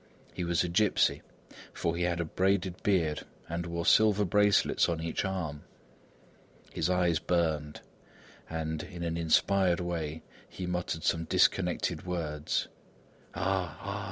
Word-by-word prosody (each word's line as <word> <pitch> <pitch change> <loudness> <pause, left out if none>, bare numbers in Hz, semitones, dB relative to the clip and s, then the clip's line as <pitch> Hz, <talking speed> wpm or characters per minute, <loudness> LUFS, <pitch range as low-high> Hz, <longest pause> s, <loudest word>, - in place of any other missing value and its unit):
He 90 - -3
was 85 -1 +1
a - - -1
gipsy 100 +4 +2 0.5
for 85 0 -1
he 85 - -3
had 85 -1 0
a 85 - 0
braided 95 +1 0
beard 85 -7 +1 0.3
and 85 +1 -3
wore 85 0 -3
silver 105 -1 +5
bracelets 105 +1 +3
on 85 -1 -1
each 80 0 -2
arm. 85 -7 -3 1.1
His - - 0
eyes 90 -3 +2
burned 80 -4 -1 0.7
and, 80 -1 -3
in 85 -2 -7
an 85 -1 -2
inspired 90 +2 +3
way, 80 -3 -3 0.3
he 90 - -6
muttered 90 -2 -3
some 80 0 +1
disconnected - - +1
words: 80 -4 -2 0.7
"Ah! 95 -1 -1
Ah! 100 +1 -4
85 Hz, 135 wpm, -30 LUFS, 80-95 Hz, 1.1 s, silver